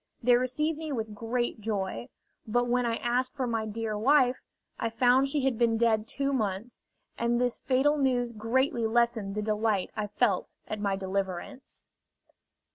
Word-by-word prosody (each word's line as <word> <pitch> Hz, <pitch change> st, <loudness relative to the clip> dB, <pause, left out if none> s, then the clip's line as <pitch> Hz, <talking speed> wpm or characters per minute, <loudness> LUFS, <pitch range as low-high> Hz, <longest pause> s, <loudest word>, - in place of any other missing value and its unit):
They 245 Hz, +1 st, +5 dB
received 290 Hz, +6 st, 0 dB
me 315 Hz, -2 st, -4 dB
with 220 Hz, -5 st, -3 dB
great 235 Hz, +2 st, -2 dB
joy; 190 Hz, -, -3 dB, 0.4 s
but 245 Hz, +3 st, +2 dB
when 245 Hz, 0 st, +1 dB
I 230 Hz, -, 0 dB
asked 250 Hz, +3 st, -1 dB
for 265 Hz, -2 st, -1 dB
my 225 Hz, -2 st, -1 dB
dear 220 Hz, 0 st, -3 dB
wife, 255 Hz, +3 st, +4 dB, 0.4 s
I 230 Hz, -, 0 dB
found 250 Hz, +3 st, +4 dB
she 275 Hz, -1 st, 0 dB
had 250 Hz, -4 st, 0 dB
been 230 Hz, -1 st, +3 dB
dead 220 Hz, -1 st, +2 dB
two 275 Hz, +2 st, -1 dB
months, 215 Hz, -1 st, -2 dB, 0.4 s
and 235 Hz, 0 st, +1 dB
this 245 Hz, -1 st, 0 dB
fatal 280 Hz, +3 st, +2 dB
news 250 Hz, -3 st, +1 dB
greatly 235 Hz, +2 st, 0 dB
lessened 225 Hz, -3 st, +1 dB
the 210 Hz, -, -1 dB
delight 215 Hz, -2 st, 0 dB
I 210 Hz, -1 st, -2 dB
felt 210 Hz, -2 st, 0 dB
at 215 Hz, -, -4 dB
my 200 Hz, -1 st, 0 dB
deliverance. 195 Hz, +6 st, -4 dB
235 Hz, 165 wpm, -29 LUFS, 215-255 Hz, 0.4 s, They